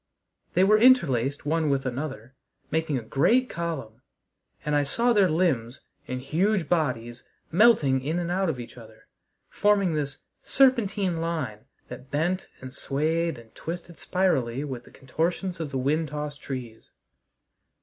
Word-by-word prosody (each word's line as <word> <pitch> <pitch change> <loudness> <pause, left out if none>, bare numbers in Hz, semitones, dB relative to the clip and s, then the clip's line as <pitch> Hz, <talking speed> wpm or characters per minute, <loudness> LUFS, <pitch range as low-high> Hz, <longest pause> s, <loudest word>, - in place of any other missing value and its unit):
They 180 - +5
were 215 +2 +5
interlaced 145 - +4
one 160 0 +1
with 135 -1 0
another, 130 -2 -5 0.4
making 160 -3 0
a 120 - -4
great 175 - +2
column, 140 -9 -5 0.6
and 150 - 0
I 145 - +4
saw 235 - +1
their 200 -4 +4
limbs 140 -8 0 0.3
and 125 0 -3
huge 175 +6 0
bodies 125 -8 -1 0.3
melting 165 - +4
in 155 +5 -1
and 175 0 -2
out 190 0 +1
of 135 -6 -3
each 120 +1 -9
other, 110 -1 -15 0.4
forming 200 -4 +2
this 145 -2 -2 0.2
serpentine 215 -9 +2
line 155 -11 -3 0.2
that 125 +2 -10
bent 175 +6 -1
and 130 0 -8
swayed 160 +4 -1
and 115 -1 -15
twisted 170 0 -7
spirally 140 -9 0
with 130 -5 -6
the - - -16
contortions 170 +7 -2
of 160 -3 -3
the 135 - -3
wind 150 +5 +1
tossed 150 0 -5
trees. 125 -5 -7
155 Hz, 150 wpm, -26 LUFS, 130-175 Hz, 0.6 s, They